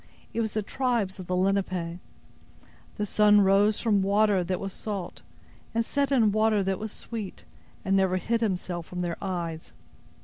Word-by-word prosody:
"It 230 Hz, -, 0 dB
was 220 Hz, -2 st, -2 dB
the 215 Hz, -, -1 dB
tribes 230 Hz, -5 st, -1 dB
of 180 Hz, -, -7 dB
the 180 Hz, -, 0 dB
Lenape! 185 Hz, -2 st, 0 dB, 1.0 s
The 210 Hz, -, -1 dB
sun 210 Hz, 0 st, +5 dB
rose 200 Hz, +2 st, +4 dB
from 210 Hz, -4 st, +2 dB
water 200 Hz, -1 st, +3 dB
that 180 Hz, +1 st, -2 dB
was 195 Hz, -1 st, -5 dB
salt, 200 Hz, -5 st, -5 dB, 0.5 s
and 230 Hz, 0 st, +1 dB
set 280 Hz, +1 st, 0 dB
in 230 Hz, -6 st, +4 dB
water 215 Hz, -1 st, +2 dB
that 190 Hz, -1 st, -1 dB
was 215 Hz, 0 st, -5 dB
sweet, 215 Hz, -4 st, -7 dB, 0.4 s
and 195 Hz, -, +2 dB
never 190 Hz, -1 st, +3 dB
hid 230 Hz, +6 st, -1 dB
himself 180 Hz, -5 st, -2 dB
from 180 Hz, 0 st, -5 dB
their 170 Hz, -1 st, -2 dB
eyes. 170 Hz, -4 st, -4 dB
195 Hz, 170 wpm, -27 LUFS, 185-215 Hz, 1.0 s, sun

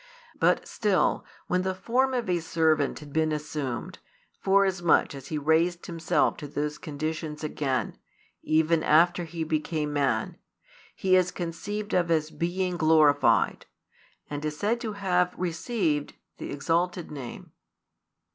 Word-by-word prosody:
But -, -, +2 dB
still, 205 Hz, -4 st, +1 dB, 0.2 s
when 180 Hz, 0 st, +1 dB
the 185 Hz, 0 st, -2 dB
form 260 Hz, +7 st, +1 dB
of 240 Hz, -4 st, -1 dB
a 180 Hz, -1 st, +1 dB
servant 160 Hz, -3 st, +1 dB
had 145 Hz, -2 st, -11 dB
been 155 Hz, 0 st, +2 dB
assumed, 150 Hz, -5 st, -4 dB, 0.4 s
forasmuch 190 Hz, -5 st, +3 dB
as 135 Hz, -1 st, -9 dB
He 155 Hz, -, -3 dB
raised 165 Hz, +4 st, +1 dB
Himself 165 Hz, -2 st, +1 dB
to 150 Hz, -, -7 dB
those 150 Hz, +1 st, -3 dB
conditions 155 Hz, 0 st, -4 dB
again, 135 Hz, -6 st, -2 dB, 0.4 s
even 160 Hz, +1 st, +2 dB
after 170 Hz, +3 st, +4 dB
He 165 Hz, 0 st, -4 dB
became 155 Hz, -1 st, -2 dB
man, 140 Hz, -2 st, 0 dB, 0.6 s
He 185 Hz, -2 st, +3 dB
is 180 Hz, -1 st, +3 dB
conceived 205 Hz, +5 st, -5 dB
of 175 Hz, -2 st, +2 dB
as 155 Hz, -2 st, +1 dB
being 180 Hz, +1 st, -2 dB
"glorified," 155 Hz, -3 st, +3 dB, 0.6 s
and 145 Hz, 0 st, -5 dB
is 150 Hz, -1 st, -3 dB
said 225 Hz, +6 st, 0 dB
to 220 Hz, -3 st, -3 dB
have 180 Hz, -3 st, +1 dB
"received" 170 Hz, -, -1 dB, 0.2 s
[the -, -, -6 dB
exalted 170 Hz, +4 st, -1 dB
name]. 135 Hz, -5 st, -8 dB
165 Hz, 135 wpm, -27 LUFS, 150-180 Hz, 0.6 s, after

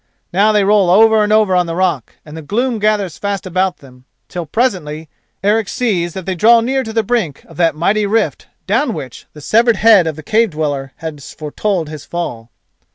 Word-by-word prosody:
Now 205 Hz, +4 st, +4 dB
they 210 Hz, -1 st, +2 dB
roll 200 Hz, -2 st, +3 dB
over 220 Hz, +3 st, +5 dB
and 210 Hz, -, -1 dB
over 215 Hz, -3 st, +3 dB
on 180 Hz, -1 st, +2 dB
the 165 Hz, -, -4 dB
rock, 175 Hz, -, -1 dB
and 150 Hz, 0 st, -11 dB
the 160 Hz, -, -7 dB
gloom 230 Hz, -, -1 dB
gathers 205 Hz, -5 st, 0 dB
fast 200 Hz, -1 st, -3 dB
about 185 Hz, 0 st, -1 dB
them 125 Hz, -2 st, -18 dB, 0.2 s
till 175 Hz, -2 st, -5 dB
presently 160 Hz, -, -2 dB, 0.3 s
Eric 210 Hz, +1 st, +1 dB
sees 180 Hz, -9 st, -1 dB
that 190 Hz, -2 st, -6 dB
they 190 Hz, -, -2 dB
draw 230 Hz, +6 st, +5 dB
near 265 Hz, +4 st, 0 dB
to 220 Hz, -, -6 dB
the 225 Hz, 0 st, 0 dB
brink 200 Hz, -, -2 dB
of -, -, -17 dB
that 165 Hz, -3 st, +2 dB
mighty 205 Hz, +6 st, +1 dB
rift 205 Hz, -8 st, -1 dB, 0.2 s
down -, -, 0 dB
which -, -, -9 dB
the 150 Hz, -, -12 dB
severed 230 Hz, -, +3 dB
head 205 Hz, -5 st, +5 dB
of 160 Hz, -, -2 dB
the 155 Hz, -, -10 dB
cave 225 Hz, 0 st, +2 dB
dweller 145 Hz, -4 st, -3 dB
has 155 Hz, -3 st, -8 dB
foretold 165 Hz, +3 st, -2 dB
his 150 Hz, -2 st, -8 dB
fall. 120 Hz, -10 st, -5 dB
190 Hz, 205 wpm, -16 LUFS, 160-215 Hz, 0.3 s, over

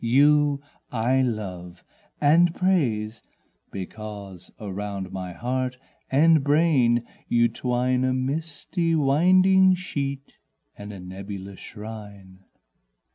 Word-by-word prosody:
you 145 Hz, +4 st, +4 dB, 0.3 s
I 125 Hz, +3 st, +2 dB
love 95 Hz, -7 st, -4 dB, 0.4 s
and 165 Hz, +4 st, +4 dB
praise, 115 Hz, -, 0 dB, 0.5 s
Because 100 Hz, -1 st, -8 dB
around 100 Hz, -2 st, -5 dB
my 95 Hz, -1 st, -5 dB
heart 125 Hz, +3 st, -2 dB, 0.3 s
and 155 Hz, +2 st, +4 dB
brain 140 Hz, -6 st, +3 dB, 0.2 s
you 120 Hz, 0 st, +3 dB
twine 125 Hz, +2 st, 0 dB
A 130 Hz, -, +2 dB
misty 160 Hz, +5 st, -2 dB
winding 185 Hz, +6 st, +5 dB
sheet 140 Hz, -6 st, -5 dB, 0.4 s
and 105 Hz, 0 st, -9 dB
a 100 Hz, -, -9 dB
nebulous 95 Hz, +1 st, -8 dB
shrine. 105 Hz, -3 st, -10 dB
125 Hz, 95 wpm, -25 LUFS, 100-145 Hz, 0.5 s, winding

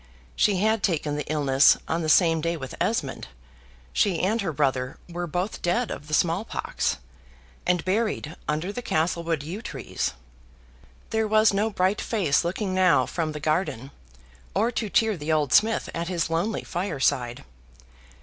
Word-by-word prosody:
She 205 Hz, -3 st, +3 dB
had 220 Hz, +2 st, +2 dB
taken 155 Hz, -6 st, 0 dB
the 150 Hz, 0 st, -4 dB
illness 140 Hz, -2 st, +5 dB
on 165 Hz, +1 st, -1 dB
the 155 Hz, -, -1 dB
same 165 Hz, -1 st, +4 dB
day 170 Hz, +1 st, -1 dB
with 135 Hz, -3 st, -7 dB
Esmond -, -, -1 dB, 0.7 s
she 185 Hz, -5 st, +2 dB
and 215 Hz, +5 st, +1 dB
her 190 Hz, -4 st, -1 dB
brother 130 Hz, -3 st, 0 dB
were 175 Hz, 0 st, -4 dB
both 180 Hz, +6 st, -3 dB
dead 230 Hz, +7 st, 0 dB
of 145 Hz, -, -7 dB
the 155 Hz, -, +1 dB
small 175 Hz, +5 st, +1 dB
pox, -, -, -2 dB, 0.7 s
and 180 Hz, -2 st, +1 dB
buried 190 Hz, -5 st, -1 dB
under 155 Hz, +6 st, -1 dB
the 245 Hz, -, -4 dB
Castlewood 165 Hz, -, -1 dB
yew 180 Hz, +8 st, -6 dB
trees. -, -, -4 dB, 1.0 s
There 220 Hz, -1 st, +1 dB
was 215 Hz, 0 st, +4 dB
no 210 Hz, +3 st, +1 dB
bright 190 Hz, -1 st, +1 dB
face 185 Hz, -, +1 dB
looking 185 Hz, +3 st, -2 dB
now 185 Hz, -2 st, +4 dB
from 160 Hz, -3 st, -3 dB
the 150 Hz, -, -5 dB
garden, 150 Hz, -4 st, -1 dB, 0.6 s
or 220 Hz, +5 st, +2 dB
to 225 Hz, -3 st, -2 dB
cheer 225 Hz, 0 st, +2 dB
the 155 Hz, -1 st, -3 dB
old 150 Hz, -4 st, +1 dB
smith 225 Hz, +1 st, +4 dB
at 170 Hz, 0 st, -3 dB
his 170 Hz, -3 st, -1 dB
lonely 175 Hz, +7 st, -1 dB
fireside. 140 Hz, -9 st, -1 dB
170 Hz, 160 wpm, -25 LUFS, 155-205 Hz, 1.0 s, illness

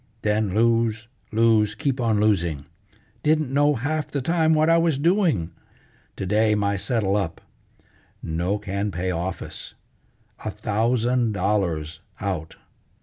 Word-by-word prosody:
Then 105 Hz, -2 st, 0 dB
lose, 115 Hz, -1 st, +2 dB, 0.2 s
lose, 110 Hz, -1 st, +3 dB
keep 140 Hz, -3 st, -1 dB
on 110 Hz, -3 st, +2 dB
losing. 85 Hz, -9 st, +1 dB, 0.6 s
Didn't 155 Hz, -3 st, +1 dB
know 145 Hz, +1 st, +3 dB
half 150 Hz, +5 st, -2 dB
the 140 Hz, -, -3 dB
time 160 Hz, +3 st, +2 dB
what 155 Hz, +1 st, +3 dB
I 165 Hz, 0 st, +5 dB
was 165 Hz, -4 st, +2 dB
doing. 160 Hz, -, +1 dB, 0.6 s
To -, -, -4 dB
day 105 Hz, +2 st, +2 dB
my 100 Hz, -1 st, 0 dB
settle 100 Hz, -1 st, 0 dB
up; 95 Hz, -6 st, -2 dB, 0.8 s
no 85 Hz, +5 st, -1 dB
can 100 Hz, +1 st, -3 dB
pay 90 Hz, 0 st, -2 dB
office. 90 Hz, +2 st, -5 dB, 0.7 s
A 110 Hz, -, -2 dB
thousand 115 Hz, +3 st, 0 dB
dollars 90 Hz, -5 st, -1 dB, 0.2 s
out! 90 Hz, -6 st, -4 dB
110 Hz, 130 wpm, -24 LUFS, 95-130 Hz, 0.8 s, I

